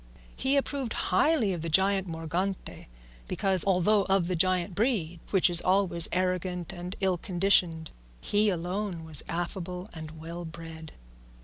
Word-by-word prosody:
He 270 +2 0
approved 275 -4 -2
highly 225 - +1
of 170 - -5
the 165 - -4
giant 190 +3 +2
Morgante, 170 +4 -4 0.4
because, 190 -3 +3
although 195 +2 +2
of 195 -2 +1
the 180 +1 -1
giant 185 +1 +1
breed 195 -6 -1
which 190 -3 +3
is 175 -1 +9
always 185 -3 +2
arrogant 180 -1 -2
and 180 +1 -7
ill 185 -2 0
conditioned, 175 -4 +1 0.3
he 210 - +1
alone 180 -1 -4
was 155 -3 +4
affable 180 +2 -5
and 160 -1 -9
well 170 +2 -7
bred. 160 -1 -10
180 Hz, 140 wpm, -27 LUFS, 170-195 Hz, 0.4 s, is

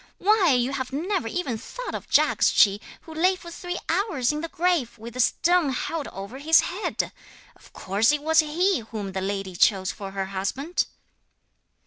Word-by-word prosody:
'Why, 390 -6 +4
you 250 +1 +1
have 260 -1 -3
never 330 - -1
even 255 -5 -3
thought - - -7
of - - -6
Jagdschi, 205 -1 +4 0.2
who 320 - -11
lay 365 +4 +3
for 345 -2 -11
three 355 +1 -5
hours 330 - +1
in 300 0 -4
the 330 - -3
grave, 335 -9 0
with 230 +2 -10
a - - -6
stone 340 +5 +3
held 290 +4 -3
over 200 +7 -8
his 320 +3 +5
head! 375 +4 -3 0.4
Of - - -20
course 205 +6 +1
it 295 -1 -1
was 320 +1 +4
he 340 +4 +2
whom 215 -3 -6
the 190 0 -3
lady 195 -1 -3
chose 190 0 +3
for 195 -1 -7
her 195 0 -3
husband!' 200 - -2
280 Hz, 175 wpm, -25 LUFS, 215-350 Hz, 0.4 s, his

